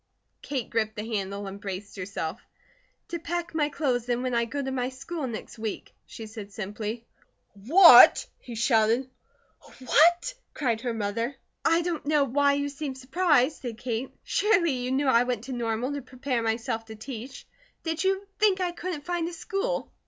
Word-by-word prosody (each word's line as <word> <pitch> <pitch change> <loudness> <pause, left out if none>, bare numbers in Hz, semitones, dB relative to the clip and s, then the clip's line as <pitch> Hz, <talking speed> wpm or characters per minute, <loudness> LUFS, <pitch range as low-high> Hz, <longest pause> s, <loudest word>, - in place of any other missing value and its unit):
Kate 270 -5 -3
gripped 220 -1 0
the 210 - -4
handle 200 -2 -3
and 195 +1 -8
braced 200 0 -6
herself. 185 -4 -4 0.7
"To 340 - -3
pack 345 +1 -4
my 300 -2 +1
clothes 250 -5 -1
in 245 +1 0
when 255 -1 -1
I 235 0 +2
go 280 +5 -5
to 265 - -3
my 255 -1 -1
school 275 +3 -5
next 225 -1 -7
week," 220 -2 -5
she 225 - -8
said 215 -2 -9
simply. 215 +3 -5 0.5
"What?" 310 - +8
he 240 - -9
shouted. 230 +2 +2 0.7
"What?" 340 - +4 0.2
cried 235 -6 0
her 245 -1 -2
mother. 230 +5 -2 0.3
"I 330 +1 +3
don't 330 -4 -3
know 300 -1 +4
why 280 +2 +3
you 285 0 0
seem 280 -1 -5
surprised," 280 +1 +2
said 235 -4 -5
Kate. 240 +1 -3
"Surely 400 -6 +2
you 250 -1 -2
knew 275 +2 +1
I 240 -3 +5
went 245 -3 -1
to 265 - -7
Normal 235 +2 -2
to 285 - -4
prepare 255 -1 -3
myself 225 0 -2
to 220 -1 -9
teach. 245 +3 -8 0.4
Did 325 +1 -2
you 385 +1 +1
think 410 -3 +4
I 360 -1 0
couldn't 345 -4 -5
find 345 -1 -1
a - - -10
school?" 395 +9 -3
255 Hz, 175 wpm, -27 LUFS, 225-310 Hz, 0.7 s, What